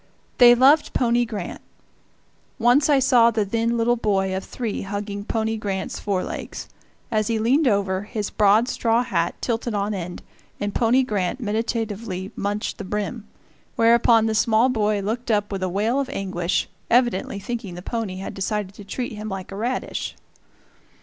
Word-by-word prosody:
They 240 Hz, 0 st, +9 dB
loved 275 Hz, +5 st, +4 dB
pony 240 Hz, -1 st, +2 dB
Grant. 210 Hz, -6 st, -6 dB, 1.0 s
Once 245 Hz, +6 st, +4 dB
I 290 Hz, -, +5 dB
saw 245 Hz, -3 st, +5 dB
the 220 Hz, -3 st, 0 dB
then 230 Hz, +3 st, 0 dB
little 235 Hz, +1 st, +2 dB
boy 195 Hz, -4 st, 0 dB
of 190 Hz, -, -3 dB
three 230 Hz, -4 st, -4 dB
hugging 200 Hz, 0 st, -4 dB
pony 220 Hz, 0 st, -1 dB
Grant's 195 Hz, -3 st, -3 dB
fore 195 Hz, -3 st, -1 dB
legs. -, -, -6 dB, 0.4 s
As 215 Hz, -2 st, +1 dB
he 230 Hz, -, 0 dB
leaned 260 Hz, +7 st, +3 dB
over, 195 Hz, -4 st, +1 dB
his 205 Hz, 0 st, -4 dB
broad 210 Hz, +3 st, +4 dB
straw 230 Hz, -1 st, +1 dB
hat 175 Hz, -8 st, -1 dB
tilted 235 Hz, -1 st, -1 dB
on 205 Hz, +1 st, -1 dB
end, 180 Hz, -2 st, -6 dB, 0.4 s
and 205 Hz, 0 st, -2 dB
pony 245 Hz, +3 st, +3 dB
Grant 205 Hz, -2 st, -2 dB
meditatively 215 Hz, -3 st, -3 dB
munched 205 Hz, +1 st, -3 dB
the -, -, -4 dB
brim; 210 Hz, +3 st, -4 dB, 0.5 s
whereupon 230 Hz, -1 st, +5 dB
the 220 Hz, -, 0 dB
small 225 Hz, +3 st, +3 dB
boy 210 Hz, -4 st, +1 dB
looked 230 Hz, +5 st, -3 dB
up 205 Hz, -2 st, +1 dB
with 195 Hz, -1 st, -3 dB
a 185 Hz, -, 0 dB
wail 215 Hz, +8 st, 0 dB
of 275 Hz, -, -2 dB
anguish, 185 Hz, -3 st, -1 dB, 0.2 s
evidently 240 Hz, -5 st, +2 dB
thinking 215 Hz, -3 st, -5 dB
the 175 Hz, -, -8 dB
pony 225 Hz, -4 st, -3 dB
had 190 Hz, +1 st, -6 dB
decided 200 Hz, 0 st, -3 dB
to 205 Hz, -, -11 dB
treat 240 Hz, +5 st, -4 dB
him 215 Hz, -1 st, -6 dB
like 190 Hz, -1 st, -6 dB
a -, -, -6 dB
radish. 240 Hz, +5 st, -3 dB
215 Hz, 170 wpm, -23 LUFS, 200-235 Hz, 1.0 s, They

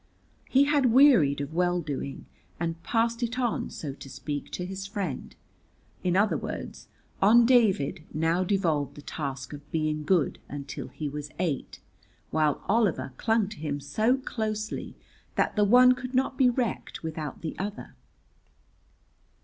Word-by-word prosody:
He 270 Hz, +2 st, +5 dB
had 285 Hz, -2 st, +3 dB
wearied 225 Hz, -, +6 dB
of 140 Hz, +2 st, -5 dB
well 175 Hz, +1 st, +2 dB
doing, 140 Hz, -3 st, -5 dB, 0.3 s
and 165 Hz, 0 st, -3 dB
passed 230 Hz, +3 st, 0 dB
it 240 Hz, +1 st, -2 dB
on, 245 Hz, -3 st, -1 dB
so 145 Hz, -4 st, -6 dB
to 135 Hz, -, -11 dB
speak, 145 Hz, +2 st, -5 dB
to 180 Hz, -, -3 dB
his 195 Hz, +1 st, -5 dB
friend. 195 Hz, -, -4 dB, 0.7 s
In 180 Hz, -1 st, +1 dB
other 205 Hz, +1 st, +3 dB
words, -, -, -6 dB, 0.3 s
on 230 Hz, +4 st, +7 dB
David 195 Hz, -, +3 dB
now 165 Hz, +3 st, +1 dB
devolved 175 Hz, -7 st, 0 dB
the 145 Hz, -, -11 dB
task 135 Hz, -3 st, -5 dB
of 145 Hz, 0 st, -11 dB
being 155 Hz, -1 st, -1 dB
good 170 Hz, -2 st, +1 dB
until 140 Hz, -1 st, -6 dB
he 155 Hz, -, -5 dB
was 145 Hz, +1 st, -5 dB
eight, 170 Hz, -6 st, -3 dB, 0.5 s
while 155 Hz, -2 st, +1 dB
Oliver 205 Hz, -, +1 dB
clung 225 Hz, -2 st, +2 dB
to 210 Hz, -, -9 dB
him 145 Hz, -2 st, -3 dB
so 215 Hz, -, +1 dB
closely 215 Hz, -4 st, -4 dB, 0.4 s
that -, -, +1 dB
the 210 Hz, -, +4 dB
one 250 Hz, +4 st, +7 dB
could 255 Hz, +1 st, -3 dB
not 265 Hz, +1 st, +1 dB
be 260 Hz, -2 st, +5 dB
wrecked 240 Hz, -8 st, -2 dB
without 155 Hz, -2 st, -5 dB
the 160 Hz, -, -4 dB
other. 205 Hz, +3 st, -5 dB
180 Hz, 150 wpm, -27 LUFS, 150-230 Hz, 0.7 s, on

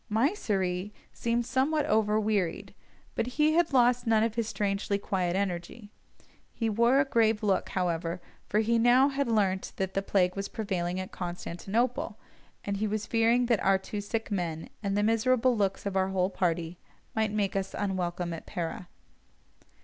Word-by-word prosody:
Mysseri 210 Hz, -, 0 dB, 0.2 s
seemed 235 Hz, 0 st, -1 dB
somewhat 285 Hz, +5 st, +1 dB
over 215 Hz, 0 st, +2 dB
wearied, 205 Hz, -5 st, -1 dB, 0.4 s
but -, -, -1 dB
he 305 Hz, 0 st, +4 dB
had 340 Hz, -1 st, +3 dB
lost 245 Hz, -2 st, +3 dB
none 220 Hz, -1 st, +4 dB
of 225 Hz, -1 st, 0 dB
his 230 Hz, -1 st, -1 dB
strangely 200 Hz, -1 st, -1 dB
quiet 185 Hz, -3 st, -1 dB
energy. 200 Hz, +3 st, -3 dB, 0.6 s
He 225 Hz, -2 st, -1 dB
wore 235 Hz, +5 st, +4 dB
a 275 Hz, -, +3 dB
grave 225 Hz, -4 st, +2 dB
look, 195 Hz, -3 st, +1 dB
however, 170 Hz, -1 st, -1 dB, 0.3 s
for 210 Hz, -, +2 dB
he 230 Hz, +1 st, +2 dB
now 245 Hz, +4 st, +5 dB
had 280 Hz, -1 st, -1 dB
learnt 200 Hz, -4 st, 0 dB
that 190 Hz, 0 st, -2 dB
the 195 Hz, -, 0 dB
plague 185 Hz, -2 st, +1 dB
was 195 Hz, 0 st, -4 dB
prevailing 185 Hz, -4 st, -2 dB
at 185 Hz, -, -6 dB
Constantinople, 195 Hz, +7 st, -2 dB, 0.5 s
and 200 Hz, -1 st, -2 dB
he 215 Hz, +2 st, 0 dB
was 210 Hz, 0 st, -2 dB
fearing 230 Hz, +2 st, +3 dB
that 235 Hz, -4 st, +1 dB
our 195 Hz, 0 st, +4 dB
two 200 Hz, +2 st, -5 dB
sick 225 Hz, +2 st, -3 dB
men, 170 Hz, -5 st, -3 dB
and 200 Hz, -1 st, -1 dB
the 205 Hz, -, +2 dB
miserable 240 Hz, +3 st, +3 dB
looks 200 Hz, -2 st, -1 dB
of 200 Hz, -1 st, -2 dB
our 190 Hz, 0 st, +2 dB
whole 190 Hz, 0 st, 0 dB
party, 170 Hz, -2 st, -1 dB, 0.4 s
might 220 Hz, -1 st, +1 dB
make 205 Hz, -2 st, -1 dB
us 195 Hz, 0 st, -2 dB
unwelcome 180 Hz, -3 st, -2 dB
at 165 Hz, -, -8 dB
Pera. 175 Hz, +1 st, -4 dB
205 Hz, 170 wpm, -29 LUFS, 185-230 Hz, 0.6 s, now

